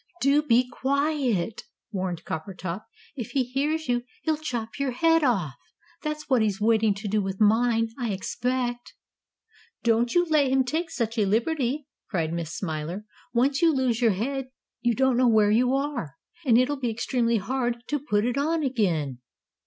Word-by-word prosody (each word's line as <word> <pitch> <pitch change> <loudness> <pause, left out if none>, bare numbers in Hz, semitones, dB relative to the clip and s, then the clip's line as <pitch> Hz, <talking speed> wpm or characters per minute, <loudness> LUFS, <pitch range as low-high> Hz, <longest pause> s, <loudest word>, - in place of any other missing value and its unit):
"Do 280 +2 +4
be 250 -4 +3
quiet!" 265 - 0 0.3
warned 185 -4 -3
Coppertop. 180 +3 -5 0.3
"If 245 -3 -6
he 270 - +2
hears 290 +6 -1
you 240 0 +1 0.2
he'll 315 -1 +1
chop 245 -6 -4
your 275 -3 0
head 325 +4 +3
off! 195 - +1 0.5
That's 305 -1 -4
what 260 -4 +3
he's 210 -2 0
waiting 220 -1 +3
to 205 +2 -6
do 210 +1 +1
with 190 -1 -4
mine, 225 +1 +3
I 240 -2 -1
expect." 245 +5 -2 0.9
"Don't 235 +2 +2
you 350 0 +5
let 305 -4 +3
him 265 0 +3
take 320 +6 -2
such 230 -6 -2
a 210 - +3
liberty," 260 +5 0 0.2
cried 165 -5 -1
Miss 170 -2 -3
Smiler. 170 +3 -4 0.3
"Once 270 +4 +2
you 335 -1 +5
lose 255 -4 0
your 230 -4 +4
head 260 +6 -3 0.3
you 240 -1 +1
don't 265 0 +2
know 255 0 +4
where 215 -3 +4
you 250 +4 +3
are. 270 - -3 0.3
And 230 -2 +6
it'll 270 +3 +2
be 245 -3 -1
extremely 235 0 0
hard 240 +2 -2
to 295 - 0
put 210 -6 0
it 245 +3 0
on 315 +2 +1
again." 170 - 0
240 Hz, 170 wpm, -26 LUFS, 210-275 Hz, 0.9 s, And